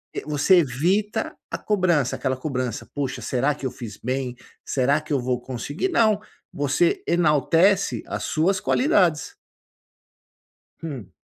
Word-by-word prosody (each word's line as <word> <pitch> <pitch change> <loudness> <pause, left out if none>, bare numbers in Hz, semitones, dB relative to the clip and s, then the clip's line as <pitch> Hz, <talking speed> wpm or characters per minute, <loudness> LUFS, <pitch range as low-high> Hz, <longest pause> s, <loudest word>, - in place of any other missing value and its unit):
eh, - - -3
você 150 +5 +4
evita 180 - 0 0.2
a - - -2
cobrança. 175 - +1
Aquela 130 -1 -1
cobrança: 130 -4 -3
“Puxa, 135 -2 -3
será 135 +3 0
que 140 - -8
eu 130 - -1
fiz 115 -5 -8
bem? 130 0 -2 0.3
Será 140 +3 +2
que 155 0 -5
eu 140 - +2
vou 125 0 -1
conseguir?”. 135 - -3
Não, 220 - +3 0.3
você 145 +4 +1
enaltece 170 +4 +3
as - - -4
suas 185 +5 +1
qualidades. 185 - +2 1.5
Hum. 125 - -7
150 Hz, 135 wpm, -23 LUFS, 130-180 Hz, 1.5 s, você